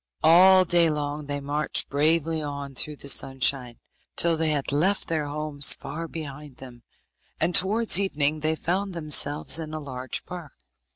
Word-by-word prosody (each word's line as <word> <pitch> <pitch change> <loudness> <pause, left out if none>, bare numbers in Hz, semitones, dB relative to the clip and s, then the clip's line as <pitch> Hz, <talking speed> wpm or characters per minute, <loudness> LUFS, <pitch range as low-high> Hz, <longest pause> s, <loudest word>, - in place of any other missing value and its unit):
All 185 +3 +6
day 170 -1 +3
long 150 -1 -4
they 145 0 -3
marched 145 +2 -1
bravely 160 +2 0
on 140 -2 -6
through 150 +3 -4
the 140 - -11
sunshine, 135 -3 0 0.4
till 170 -1 +2
they 160 0 0
had 145 -2 0
left 180 +8 +1
their 155 -3 -2
homes 145 -1 +1
far 165 +1 -7
behind 150 -4 -9
them, 125 -2 -13 0.6
and 170 +3 0
towards 205 +2 +4
evening 155 -6 -1
they 155 +1 -1
found 185 +4 -3
themselves 150 -1 +2
in 155 -1 -6
a - - -4
large 130 -3 -4
park. 175 -5 -9
150 Hz, 160 wpm, -24 LUFS, 145-165 Hz, 0.6 s, All